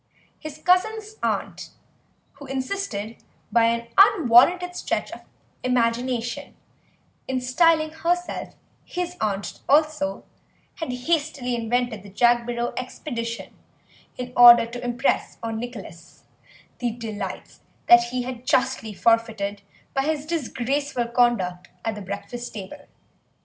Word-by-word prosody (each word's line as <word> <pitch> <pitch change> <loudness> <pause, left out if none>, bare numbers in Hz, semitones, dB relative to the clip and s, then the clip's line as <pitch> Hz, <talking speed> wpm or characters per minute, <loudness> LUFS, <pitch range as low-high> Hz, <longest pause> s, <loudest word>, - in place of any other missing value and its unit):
His 310 -2 -8
cousins' 430 +6 +1
aunt, - - -2 0.7
who 285 - -10
insisted, 260 - -4 0.3
by 230 +1 +4
an 235 0 0
unwarranted 355 - +5
stretch - - -2
of - - -9 0.4
imagination, 240 -1 -1 0.7
in 260 -1 -1
styling 310 +5 +3
herself 350 +2 -2 0.3
his 355 -1 -4
aunt 200 -2 -2
also, 295 -10 +2 0.5
had 320 -6 -4
hastily 280 -1 -1
invented 235 -1 -1
the 200 - -12
Jagborough 240 +2 +1
expedition 240 -2 -5 0.6
in 250 0 -6
order 240 -1 +9
to 240 +1 -8
impress 245 +3 0
on 225 -1 -3
Nicholas 200 -8 -9 0.6
the 245 - 0
delights 225 -2 -6 0.2
that 235 0 +7
he 250 +1 -3
had 250 -1 -6
justly 250 -5 +1
forfeited 220 -3 +1 0.3
by 270 - +1
his 300 +1 -1
disgraceful 270 -4 -2
conduct 195 -8 +1 0.2
at 225 - 0
the 210 - -8
breakfast 205 +5 -6
table. 250 +9 -9
245 Hz, 115 wpm, -24 LUFS, 230-290 Hz, 0.7 s, order